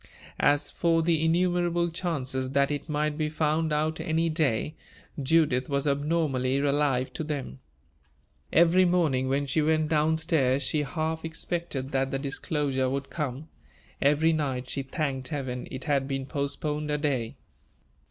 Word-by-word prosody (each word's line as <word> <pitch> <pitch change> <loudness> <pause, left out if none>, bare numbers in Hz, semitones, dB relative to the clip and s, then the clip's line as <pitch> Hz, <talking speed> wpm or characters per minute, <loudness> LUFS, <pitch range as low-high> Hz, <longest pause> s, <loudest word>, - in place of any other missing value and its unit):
As 145 0 +3
for 165 -1 +2
the 160 -1 +2
innumerable 175 0 +1
chances 135 -7 -2
that 140 +1 +3
it 145 +2 -4
might 150 0 -1
be 155 -1 0
found 155 +1 0
out 155 +2 0
any 165 0 0
day, 155 -3 0 0.5
Judith 140 -3 +2
was 140 +1 0
abnormally 140 -3 +1
alive 140 -2 +1
to - - -4
them. 140 - -4 0.9
Every 170 +3 +5
morning, 160 -8 +2
when 140 +1 +1
she 140 +3 +1
went 155 0 +2
down 155 0 +2
stairs, 140 -5 +1
she 150 +3 0
half 160 +2 -2
expected 160 -4 -3
that 135 0 +1
the 135 - -1
disclosure 135 -1 -1
would 140 +1 -3
come; 150 -1 -4 0.5
every 150 +3 +4
night 130 -5 -2
she 140 - -1
thanked 135 -2 -3
Heaven 130 -5 -4
it 130 0 -6
had 140 -3 +1
been 135 -1 -2
postponed 150 +2 -2
a 150 - +1
day. 135 -6 -1
150 Hz, 150 wpm, -27 LUFS, 135-160 Hz, 0.9 s, Every